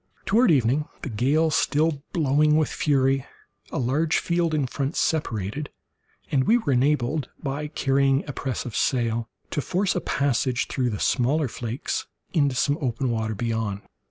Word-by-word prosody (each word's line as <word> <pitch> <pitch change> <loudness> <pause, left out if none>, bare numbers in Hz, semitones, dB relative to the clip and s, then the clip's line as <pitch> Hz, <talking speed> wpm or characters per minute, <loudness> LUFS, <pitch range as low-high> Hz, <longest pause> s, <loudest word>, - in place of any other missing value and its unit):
Toward 215 +5 +4
evening, 140 0 +2 0.2
the - - -3
gale 145 +9 +2
still 150 0 +1
blowing 150 -2 +3
with 155 - +2
fury, 135 -2 +1 0.4
a - - -4
large 145 +6 +1
field 170 -1 0
in 145 -3 +1
front 135 +3 -3
separated, 140 - -1 0.6
and 130 -2 +2
we 235 - +5
were 155 - 0
enabled, 135 +1 +1
by 145 +1 -3
carrying 135 -1 +1
a 145 - -4
press 130 -4 -3
of 120 - -6
sail 115 -3 0 0.2
to 145 - -1
force 190 +6 0
a 180 - 0
passage 130 -2 0
through 125 -2 0
the 105 -3 -4
smaller 140 +4 +2
flakes 120 +1 -4 0.3
into 145 -5 +2
some 145 +4 +1
open 125 -1 -1
water 110 -1 -1
beyond. 110 -2 -2
135 Hz, 155 wpm, -25 LUFS, 120-150 Hz, 0.6 s, we